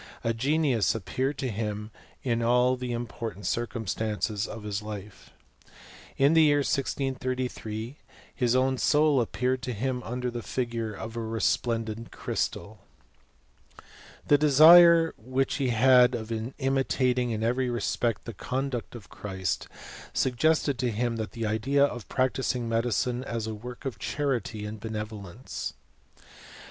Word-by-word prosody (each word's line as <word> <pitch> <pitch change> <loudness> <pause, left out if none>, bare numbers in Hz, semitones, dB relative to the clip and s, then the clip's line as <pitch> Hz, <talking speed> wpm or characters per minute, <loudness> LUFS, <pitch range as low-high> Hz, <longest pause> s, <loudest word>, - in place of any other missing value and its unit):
A 115 - +1
genius 130 -2 +1
appeared 130 +7 -2
to 130 - -2
him 105 0 -4 0.3
in 120 -2 0
all 125 +2 +3
the 125 -1 -5
important 115 -4 -5
chrcumstances 110 -2 -2
of 110 -1 -8
his 105 0 -3
life. 105 -2 -9 0.9
In 140 +3 +4
the 165 - +6
year 145 -2 +4
1 - - -1
633 130 -3 -2
r - - -35 0.3
his 125 -1 +1
own 130 0 +2
soul 150 -3 +4
appeared 125 +2 -1
to 125 -1 -3
him 125 +3 -2
under 125 +1 -3
the 120 0 -5
figure 115 -3 -3
of 110 +2 -7
a - - -3
resplendent 115 0 -1
crystal. 100 +4 -3 0.7
<;. - - -22
The 145 - +5
desire 165 +3 +8
which 130 +3 -1
he 135 -2 0
had 125 +1 +5
of 110 -1 -6 0.3
imitating 130 -2 +1
in 110 -1 -2
every 125 +2 +1
respect 115 -1 -1
the 115 - -6
conduct 125 +4 -3
of 115 -5 -10
Christ, 95 -3 -3 0.5
suggested 140 +1 +1
ttojiim^tlie 115 -1 -2
idea 135 +7 +2
of 120 -6 -6
practising 130 -2 0
medicine 120 +2 0
as 115 -4 -3
a 110 - -4
work 125 +5 -9
of 135 - -4
charity 120 -7 -2
and 105 +1 -6
benevolence. 110 0 -6
120 Hz, 135 wpm, -27 LUFS, 110-130 Hz, 0.9 s, desire